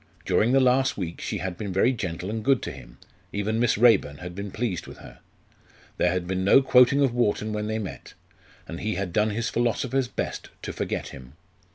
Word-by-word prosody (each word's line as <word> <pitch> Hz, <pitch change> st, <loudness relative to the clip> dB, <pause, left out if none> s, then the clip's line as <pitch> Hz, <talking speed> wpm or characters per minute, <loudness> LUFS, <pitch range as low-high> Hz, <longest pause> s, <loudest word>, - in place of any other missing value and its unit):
During 115 Hz, +3 st, +2 dB
the 135 Hz, -, +5 dB
last 130 Hz, +1 st, +3 dB
week 85 Hz, -4 st, -5 dB
she 105 Hz, -, -3 dB
had 90 Hz, -1 st, -4 dB
been 100 Hz, -3 st, -4 dB
very 95 Hz, +8 st, +3 dB
gentle 90 Hz, -3 st, -4 dB
and 110 Hz, 0 st, -4 dB
good 135 Hz, +1 st, +2 dB
to -, -, -4 dB
him 65 Hz, -4 st, -13 dB, 0.3 s
even 105 Hz, +2 st, -1 dB
Miss 120 Hz, -3 st, +2 dB
Raeburn 110 Hz, -11 st, +4 dB
had 90 Hz, +2 st, -8 dB
been 100 Hz, +2 st, -6 dB
pleased 100 Hz, -5 st, -3 dB
with -, -, -11 dB
her. -, -, -13 dB, 0.8 s
There 90 Hz, -, +2 dB
had 90 Hz, -1 st, -2 dB
been 95 Hz, +1 st, -2 dB
no 120 Hz, +8 st, +6 dB
quoting 125 Hz, +2 st, +5 dB
of 130 Hz, -4 st, +1 dB
Wharton 110 Hz, -2 st, 0 dB
when 105 Hz, 0 st, -2 dB
they 110 Hz, 0 st, -1 dB
met; 105 Hz, -4 st, -7 dB, 0.5 s
and 85 Hz, -, -6 dB
he 110 Hz, 0 st, -2 dB
had 95 Hz, -3 st, -3 dB
done 105 Hz, +3 st, +2 dB
his 115 Hz, +3 st, -2 dB
philosopher's 125 Hz, +2 st, 0 dB
best -, -, -5 dB
to -, -, -5 dB
forget -, -, -3 dB
him. 65 Hz, -1 st, -12 dB
105 Hz, 210 wpm, -25 LUFS, 90-120 Hz, 0.8 s, no